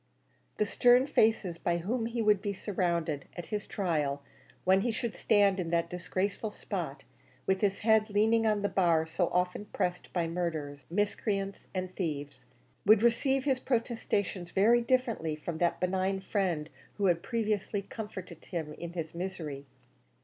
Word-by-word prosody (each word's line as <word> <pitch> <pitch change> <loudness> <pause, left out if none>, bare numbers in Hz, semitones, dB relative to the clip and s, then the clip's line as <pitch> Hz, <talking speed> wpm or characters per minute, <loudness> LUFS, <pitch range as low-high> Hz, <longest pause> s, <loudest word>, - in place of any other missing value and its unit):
The 210 - +2
stern 245 +4 +5
faces 215 - +2
by 170 0 +1
whom 225 +7 -1
he 235 0 -2
would 210 -2 +4
be 205 -1 -2
surrounded 170 -7 -1
at 175 - -5
his 210 0 -2
trial 150 -7 -1 0.4
when 190 +1 +4
he 235 +3 +1
should 225 0 -3
stand 200 -3 +3
in 170 -2 -2
that 170 0 0
disgraceful 185 +5 -2
spot, - - -5 0.4
with 190 0 +1
his 200 -2 +1
head 220 0 +4
leaning 220 +2 +3
on 210 -1 +1
that 205 - -1
bar 170 -4 +3
so 165 +2 0
often 180 +3 0
pressed 180 -3 -2
by 170 -2 0
murderers, 155 -5 -3
miscreants, 200 +1 -1
and 185 0 -3
thieves 145 -7 -4 0.4
would 215 +2 +6
receive 265 +3 +3
his 265 -2 +1
protestations 225 -7 -1
very 230 +5 +4
differently 235 - 0
from 160 +1 -5
that 170 -1 +1
benign 190 +1 0
friend 185 -6 -1 0.2
who 200 - 0
had 175 -2 +3
previously 210 -2 -1
comforted 185 -7 -8
him 160 -4 -4
in 170 +2 -7
his 165 -3 -4
misery. 170 -6 -5
190 Hz, 155 wpm, -30 LUFS, 170-215 Hz, 0.4 s, would